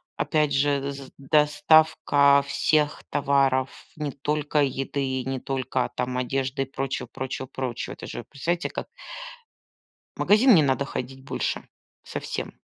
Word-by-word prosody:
Опять 150 -2 +1
же, 140 0 +1
з 135 -1 -9
доставка 150 -1 +4
всех 150 +1 +1
товаров, 135 -2 +2 0.3
не 150 -2 -3
только 150 +2 -1
еды 135 +1 -2
и 130 -1 -2
не 130 -1 -2
только 130 -1 -2
там 125 0 -2
одежды 135 +2 -1
и - - -6
прочего, 135 0 -4
прочего, 130 0 -5
прочего. 130 -2 -4
Это - - -9
же - - -6
представляете, 170 - -2
как - - -5 1.3
в - - -9
магазин 225 +4 +6
не 160 - +6
надо 140 -1 +1
ходить 130 -1 -6
больше. - - -3 0.4
Совсем. - - -5
140 Hz, 135 wpm, -25 LUFS, 130-150 Hz, 1.3 s, магазин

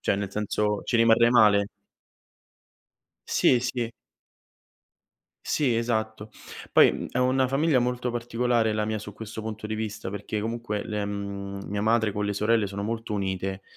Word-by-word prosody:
cioè - - +1
nel 100 -1 -3
senso 105 0 -1
ci 120 - +1
rimarrei 115 +1 +5
male. 105 -4 +5 1.6
Sì, 125 - +3
sì. 120 -1 -2 1.5
Sì, 130 -6 +1
esatto. 110 -2 -2 0.4
Poi, - - +6
mhmm, - - -5
è 125 - -1
una 130 +1 +2
famiglia 140 +1 +2
molto 125 0 -1
particolare 120 -1 0
la 105 0 0
mia 110 0 -2
su 105 -1 -9
questo 110 0 -7
punto 110 -1 -6
di 110 - -3
vista, 110 -3 -4
perché 105 +1 -4
comunque 115 -2 -3
le 105 -1 -3
mhmm, 100 -1 -5
mia 100 +1 -3
madre 110 -1 +2
con 105 0 -2
le 105 - -1
sorelle 110 +1 +2
sono 100 +1 -5
molto 115 +1 -3
unite, 95 -1 -3
110 Hz, 155 wpm, -26 LUFS, 105-120 Hz, 1.6 s, Poi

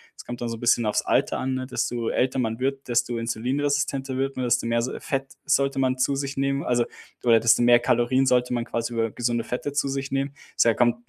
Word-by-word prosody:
Das - - -11
kommt 120 0 -7
da 120 - -2
so 115 0 -4
'n - - -14
bisschen 120 0 +2
aufs 105 - +1
Alter - - +1
an, 130 0 -1
ne? 130 0 -3
Desto 120 -2 -2
älter 130 +1 0
man 115 -1 -1
wird, 135 +1 -2
desto 120 0 0
insulinresistenter 135 +3 -1
wird 135 +1 -1
man, 130 - -1
desto 120 -1 +1
mehr 115 0 +1
so 125 - -3
Fett 135 0 -3
sollte 140 -1 +1
man 130 -1 +1
zu 130 +2 +1
sich 140 0 -4
nehmen, 140 +1 0
also 120 -1 +1 0.4
oder 115 -2 +5
desto 115 +1 +4
mehr 120 0 +6
Kalorien 120 +2 +2
sollte 125 -1 +2
man 120 -1 -1
quasi 115 +1 -3
über 115 -1 0
gesunde 120 +1 -1
Fette 135 +3 -4
zu 145 -1 0
sich 135 0 -3
nehmen. 135 +1 -2 0.2
Deshalb 115 -1 +4
kommt 120 -1 +3
125 Hz, 235 wpm, -24 LUFS, 120-135 Hz, 0.4 s, mehr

